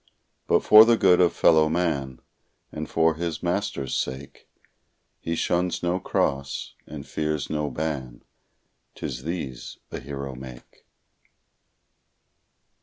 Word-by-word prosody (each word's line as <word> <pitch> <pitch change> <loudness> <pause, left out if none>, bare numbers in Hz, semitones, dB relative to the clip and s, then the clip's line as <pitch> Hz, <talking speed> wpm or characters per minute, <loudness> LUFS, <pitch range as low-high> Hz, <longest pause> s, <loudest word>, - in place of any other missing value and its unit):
But - - +3
for 110 +1 +9
the 115 0 +4
good 90 -3 +5
of 90 - +4
fellow 80 -1 +4
man, 70 -7 -1 0.5
And 75 0 -6
for 80 0 +3
his 80 0 -4
Master's 90 -7 -2
sake, 65 +2 -5 0.7
He 85 - -3
shuns 90 +2 -1
no 90 +1 0
cross, 70 -5 -2
and 75 -2 -8
fears 75 -2 -3
no 75 -1 -1
ban; 70 -6 -4 0.7
'Tis - - -5
these 80 -7 -5
a - - -5
hero 70 0 -6
make. 65 -1 -12
75 Hz, 115 wpm, -25 LUFS, 70-85 Hz, 0.7 s, for